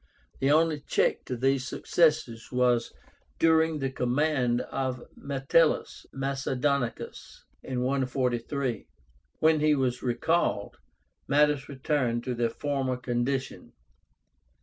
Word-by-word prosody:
The 135 - +1
only 155 0 +3
check - - 0
to 125 - -4
these 135 +1 +1
successes 150 -9 +1
was 125 -2 +2 0.5
during 160 -1 +3
the 135 -2 -2
command 125 -1 +1
of 130 -2 -3
METELLUS 140 +4 +1
MACEDONICUS 135 -1 -2 0.2
(143); 130 -1 -1 0.5
when 155 0 +3
he 150 0 +3
was 125 -3 -1
recalled, 125 -3 0 0.5
matters 145 0 +2
returned 130 -4 -1
to 125 - -2
their 120 -1 0
former 135 0 -2
condition. 125 +2 -3
135 Hz, 100 wpm, -28 LUFS, 125-145 Hz, 0.5 s, only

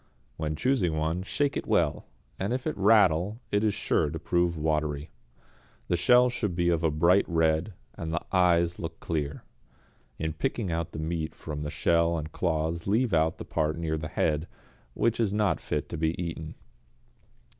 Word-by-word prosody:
When 80 -1 -3
choosing 100 - +1
one 80 +3 -1
shake 140 +9 -1
it - - -3
well; 80 -4 +1 0.3
if 120 +7 -2
it 155 - -1
rattle 100 -1 +4
it 105 +1 +2
is 105 -2 +2
sure 75 - +1
to 80 - -4
prove 85 +1 0
watery. 75 -1 -1 0.8
The - - +3
shell 125 +9 +5
should 105 -7 -2
be 85 0 +2
of 85 -2 +1
a 80 - +2
bright 85 +6 +4
red, 80 +3 +1 0.2
and 80 -1 -5
the 85 - -2
eyes 85 -2 +3
look 80 0 -6
clear. 75 -3 -3 0.7
In 80 0 -2
picking 115 - -2
out 85 -1 -2
the - - -6
meat 80 0 -3
from 75 -1 -6
the 75 - -3
shell 85 +2 +2
and 75 0 -5
claws 80 0 -1
leave 110 +2 +2
out 80 0 +2
the - - -7
part 75 0 -1
near 80 -2 -1
the 75 0 -4
head, 75 +1 0 0.5
which 115 0 +1
is 110 -4 +2
not 105 -2 +1
fit - - -2
to - - -5
be 80 +1 -1
eaten. 80 -2 -5
85 Hz, 175 wpm, -28 LUFS, 80-95 Hz, 0.8 s, shell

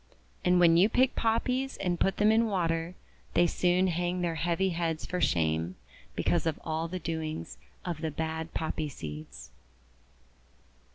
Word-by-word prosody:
And 180 0 +4
when 170 -1 +6
you 190 +5 +5
pick 255 +3 +3
Poppies 250 +4 0
and 175 -2 -1
put 195 - +1
them 210 +1 +5
in 225 +1 +4
water, 170 -3 -1 0.4
they 175 - +5
soon 180 +2 +2
hang 175 0 0
their 170 -1 0
heavy 170 +4 0
heads 165 -2 -2
for 180 0 -3
shame, 80 +1 +1 0.4
because 170 -1 +1
of 160 - -1
all 160 +1 -2
the 185 +2 -4
doings 155 - -4 0.3
of 170 -3 -3
the 160 - -1
bad 160 +1 -3
Poppy 155 -1 -2
Seeds. 75 - -8
170 Hz, 155 wpm, -29 LUFS, 160-180 Hz, 0.4 s, when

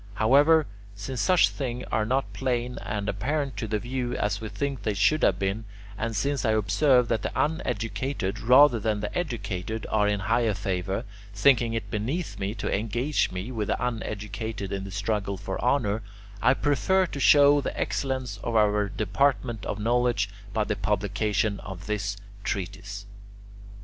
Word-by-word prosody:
However, 145 +7 +5 0.3
since 115 +5 -4
such 185 -2 +5
things 125 -3 -4
are 110 -1 +1
not 135 +3 0
plain 125 -1 -2
and 105 -3 -3
apparent 135 +8 -1
to 110 - -3
the 110 0 0
view, 120 +3 -3
as 105 0 -1
we 110 - -5
think 140 +1 -3
they 105 -2 -1
should 150 +11 +3
have 95 - +3
been, 100 +3 -2 0.3
and 115 +2 -3
since 140 +5 0
I 110 - +2
observe 125 +5 +3
that 115 -3 +1
the - - -3
uneducated 125 -6 -1
rather 125 +1 +6
than 105 -1 -1
the 105 - -4
educated 110 - -3
are 105 -1 +3
in 105 -1 0
higher 115 0 +1
favour, 95 -1 -2 0.3
thinking 120 +1 +4
it 115 - -4
beneath 130 +12 -3
me 100 +3 -2
to - - -1
engage 120 +8 0
with 105 +4 -4
the - - 0
uneducated 110 -3 -4
in 95 -1 -3
the - - -7
struggle 100 0 -2
for 95 +1 -5
honour, 115 -5 +1 0.4
I 125 - +4
prefer 185 +8 +2
to 145 - -6
show 145 +1 +6
the - - -4
excellence 130 -6 -2
of 115 - -2
our 105 -1 +3
department 110 +2 0
of - - -2
knowledge 120 -2 +1 0.2
by 110 +1 +1
the 105 - -2
publication 105 +1 0
of 90 -2 -8
this 100 -1 -2 0.3
treatise. 100 +1 -4
110 Hz, 165 wpm, -26 LUFS, 100-130 Hz, 0.4 s, rather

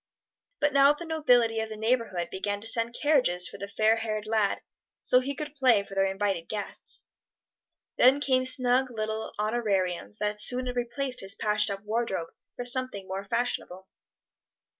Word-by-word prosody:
But 295 0 +1
now 280 +1 +6
the 340 +3 -9
nobility 245 -8 +2
of 220 0 -3
the 215 - -7
neighborhood 220 -6 -1
began 205 +1 -3
to 225 - -4
send 230 +1 +1
carriages 250 - +2
for - - -10
the 200 - -5
fair 220 +2 +2
haired 215 -2 -3
lad, 215 -2 0 0.4
so 250 - +6
he 275 +2 -4
could 295 0 -6
play 255 -8 +3
for 195 - -12
their 195 0 +2
invited 195 -3 -2
guests. 210 -2 -6 0.9
Then 260 +3 +6
came 260 -2 +1
snug 255 0 +5
little 220 -1 -4
honorariums 195 - -1
that 210 0 -2
soon 255 +3 +2
replaced 245 +2 -2
his 195 +2 -2
patched 210 0 +1
up 195 0 -5
wardrobe 210 -6 -2 0.3
for 245 - -5
something 250 -6 0
more 195 +1 -5
fashionable. 195 -4 -3
225 Hz, 160 wpm, -27 LUFS, 200-255 Hz, 0.9 s, now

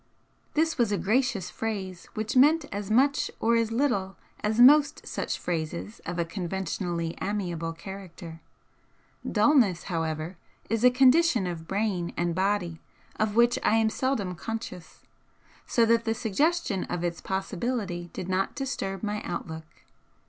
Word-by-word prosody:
This 320 -1 +1
was 230 -3 +3
a 205 - +1
gracious 220 +1 0
phrase 190 -5 -4
which 215 +4 -2
meant 295 +4 +5
as 205 0 -4
much 275 +6 +3
or 230 +1 +3
as 230 -1 +1
little 225 -7 0 0.3
as 215 +2 0
most 290 +4 +6
such - - -3
phrases 170 +5 -4
of 175 +1 -3
a 170 - +1
conventionally 175 -2 -3
amiable 175 -5 -2
character. 170 -1 -9 0.9
Dulness, 215 - +4
however, 165 +1 -2 0.3
is 225 0 0
a 250 - +9
condition 260 - +4
of 165 -2 -5
brain 195 -3 -1
and 175 -1 0
body 185 -3 -1 0.4
of 215 -1 0
which 240 +2 +4
I 220 - +3
am 220 -1 +3
seldom 225 -9 -1
conscious, 205 -3 -7 0.6
so 235 - +3
that 230 +1 +3
the 225 0 0
suggestion 240 - 0
of 175 -1 -4
its 170 -1 -2
possibility 190 -2 -3
did 180 - -6
not 190 +1 -1
disturb 195 -8 -3
my 210 0 -2
outlook. 160 -2 -5
205 Hz, 140 wpm, -27 LUFS, 175-235 Hz, 0.9 s, a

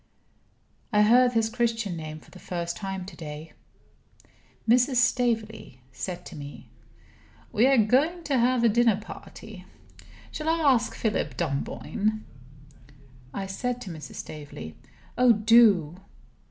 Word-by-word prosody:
I 210 -1 +4
heard 245 +3 +5
his 225 -1 +2
Christian 230 -4 -1
name 155 -1 -7
for - - -20
the 185 - -13
first 170 -1 -4
time 195 -2 -5
to 190 - -10
day. 155 0 -9 1.1
Mrs. 250 +3 +4
Staveley 225 - 0
said 175 +8 -6
to - - -10
me: 145 -1 -10 0.8
"We 235 +2 +4
are 270 -1 +4
going 280 +11 +2
to 280 -4 +1
have 245 0 +2
a - - +6
dinner 230 -2 +3
party. 215 -2 -11 0.7
Shall 310 +1 -3
I 325 - +2 0.2
ask 240 -1 -1
Philip 220 -3 -2
Dunboyne?" 200 +7 -2 1.1
I 195 +6 -4
said 245 +6 -3
to 185 - -7
Mrs. 155 -2 -9
Staveley: 140 - -8 0.4
"Oh, 250 -2 +6
do!" 210 -7 +4
215 Hz, 130 wpm, -26 LUFS, 175-240 Hz, 1.1 s, a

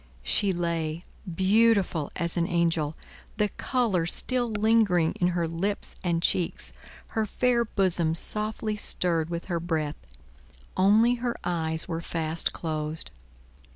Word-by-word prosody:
She 190 - +2
lay, 170 -2 -2 0.3
beautiful 195 -3 +3
as 170 0 -2
an 170 -1 +1
angel, 165 -3 0 0.4
the 210 -1 +2
color 215 -12 0
still 250 +6 +1
lingering 210 -6 +3
in 175 - +4
her 175 -2 0
lips 190 +5 -3
and 170 -2 0
cheeks, 180 -2 +1 0.4
her 220 -1 -1
fair 245 +2 +2
bosom 175 -6 +1
softly 215 +3 -2
stirred 170 -5 -1
with 170 0 -4
her 175 -2 -1
breath; 160 -3 -2 0.8
only 220 +6 +4
her 240 -1 -1
eyes 160 -2 -1
were 165 -1 -3
fast 165 -1 -1
closed. 155 -1 -4
175 Hz, 125 wpm, -27 LUFS, 165-210 Hz, 0.8 s, in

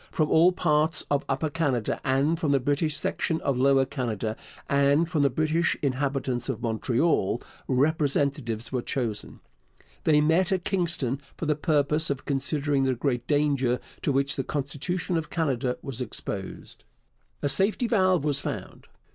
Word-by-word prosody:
From 155 -4 0
all 170 +3 +6
parts 155 -3 +2
of 145 -1 +2
Upper 140 +3 -1
Canada, 145 -9 -1
and 140 +5 +1
from 150 -5 +1
the 140 - +4
British 145 +3 0
section 165 -1 -1
of 135 -3 0
Lower 135 0 +4
Canada, 115 -6 -3 0.3
and 140 +3 +3
from 160 -4 0
the 140 - +4
British 155 +5 +1
inhabitants 135 -2 -1
of 125 -4 -2
Montreal, 115 - +1 0.3
representatives 140 -4 0
were 125 -2 -1
chosen. 120 -5 -4 0.6
They 150 -2 +4
met 165 +6 +2
at 185 -2 0
Kingston 165 -8 0 0.2
for - - -4
the 150 -1 +2
purpose 150 0 +1
of 140 -2 -3
considering 140 0 0
the 130 -1 +1
great 120 -1 -2
danger 140 -4 +1 0.2
to - - 0
which 140 +1 +1
the 135 - 0
constitution 150 +6 -2
of 155 -2 -3
Canada 130 -6 -1
was 130 -2 -5
exposed. 100 -4 -6 0.6
A - - +2
safety 195 - +2
valve 185 - +2
was 145 -2 +2
found. - - -6
140 Hz, 155 wpm, -26 LUFS, 130-155 Hz, 0.6 s, all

